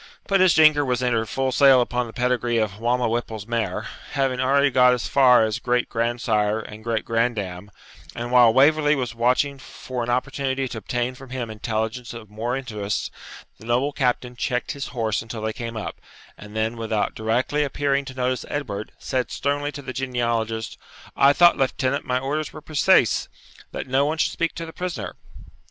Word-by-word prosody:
But 195 -1 +2
as 185 -2 +5
Jinker 155 -2 +6
was 125 -2 -1
entered 115 -3 0
full 135 +2 -1
sail 135 0 +6
upon 125 0 0
the - - -9
pedigree 120 -1 0
of 105 -2 -1
Balmawhapple's 120 -2 -1
mare, 115 0 -2 0.3
having 135 -3 0
already 140 +2 +3
got 125 0 +5
as 125 - -4
far 125 -4 +5
as 110 +1 -2
great 125 0 0
grandsire 115 -2 0
and 110 0 -10
great 115 -1 -1
grand 115 0 +1
dam, 95 -1 -6 0.5
and 120 +1 -4
while 120 -2 +7
Waverley 150 +4 +4
was 125 -4 -3
watching 125 +4 +1
for 130 -1 -7
an 120 - -3
opportunity 135 +1 -1
to 120 -2 -6
obtain 120 +4 -2
from 130 +1 -13
him 125 -3 -4
intelligence 110 +3 -3
of 110 -3 -10
more 115 +4 -2
interest, 105 -6 -3 0.5
the - - -13
noble 125 +5 +1
captain 125 -3 -1
checked 125 0 -2
his 140 -1 -5
horse 115 -4 -1
until 110 -1 -7
they 110 0 -1
came 115 0 -6
up, 110 - -6 0.3
and 105 +1 -12
then, 110 +2 -1
without 110 -2 -1
directly 120 +7 0
appearing 140 0 0
to 130 - -9
notice 130 0 -1
Edward, 110 -8 -4
said 130 -2 -2
sternly 145 +1 -1
to 145 -1 -9
the 130 - -6
genealogist, 115 -4 -2 0.4
'I 140 +1 +5
thought, 175 +3 +6
lieutenant, 135 +1 0
my 125 0 0
orders 145 +4 -2
were 155 - -10
preceese, 155 - +3 0.4
that - - -5
no 135 +1 +2
one 155 +2 -1
should - - +1
speak 170 -1 -2
to 165 - -5
the 165 - -10
prisoner?' 180 -2 -5
125 Hz, 185 wpm, -23 LUFS, 115-135 Hz, 0.5 s, while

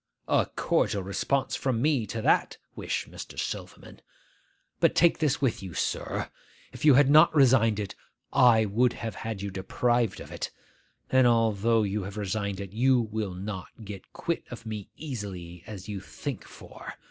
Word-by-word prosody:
'A - - +3
cordial 100 - +1
response 130 +8 -1
from 130 -4 -1
me 135 -4 +1
to 110 +2 -4
that - - +2 0.2
wish, - - -2
Mr. - - -9
Silverman! - - -6 0.8
But - - +3
take 170 -1 +4
this 150 -4 +1
with 130 -5 +1
you, 95 -4 -8
sir. - - -2 0.4
If - - -9
you 150 -4 +7
had 140 0 +6
not 155 +3 +6
resigned 120 -6 +5
it, 100 -2 -4 0.4
I 115 -3 +6
would 120 +4 +2
have 115 -2 -5
had 110 -3 -5
you 100 - -3
deprived 115 +4 0
of - - -10
it. - - -4 0.6
And 130 -1 +5
though 115 -1 +3
you 105 +1 -1
have 100 +2 -7
resigned 100 -1 -2
it, 100 -1 -7
you 130 +3 +4
will 110 -4 -3
not 95 0 -5 0.2
get 100 -2 -9
quit 170 - -3
of 120 -1 -9
me 105 -3 -6
as - - -12
easily 95 - -6
as 100 -3 -8
you 105 -2 -4
think 130 +3 -6
for. - - -11
110 Hz, 170 wpm, -28 LUFS, 100-125 Hz, 0.8 s, you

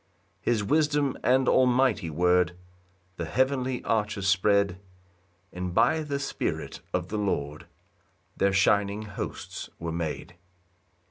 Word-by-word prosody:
3 - - +3
His 110 -3 +1
wisdom 145 +2 +2
and 130 +1 +3
almighty 125 -7 +3
word 90 +2 +2 0.6
The 85 - -3
heavenly 130 - 0
arches 105 -3 -1
spread; 100 -1 +2 0.7
And 90 0 -4
by 160 - +3
the 145 -2 -2
Spirit 140 -1 -3
of - - -2
the 105 - -2
Lord 75 -7 -2 0.7
Their 100 - +2
shining 100 +2 +2
hosts 105 -2 -6
were 85 0 -4
made. 85 +1 -4
100 Hz, 120 wpm, -27 LUFS, 90-130 Hz, 0.7 s, 3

